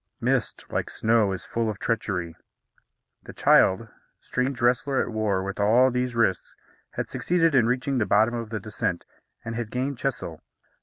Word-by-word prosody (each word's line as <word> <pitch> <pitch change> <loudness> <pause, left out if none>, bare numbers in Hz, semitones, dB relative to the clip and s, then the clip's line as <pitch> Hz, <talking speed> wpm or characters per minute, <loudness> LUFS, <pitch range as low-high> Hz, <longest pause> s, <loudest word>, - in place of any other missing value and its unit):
Mist, - - -1
like - - -2
snow, 110 -3 +2
is 90 - -4
full 115 -1 -1
of 105 - -4
treachery. 90 -8 -2 0.9
The - - -11
child, 95 +5 +4 0.3
strange 130 0 -2
wrestler 130 +2 +2
at - - 0
war 105 -4 0
with 100 +1 -5
all 120 +6 +4
these 125 -1 -1
risks, 95 -6 0 0.4
had - - -3
succeeded 165 -2 +1
in 125 -4 +4
reaching 130 +2 0
the 105 - 0
bottom 110 +3 +3
of 115 -2 -4
the 110 -1 -3
descent, 95 -4 -3 0.4
and 115 - -4
had 115 -1 -4
gained 130 +2 -3
Chesil. 115 - -3
115 Hz, 165 wpm, -25 LUFS, 105-125 Hz, 0.9 s, child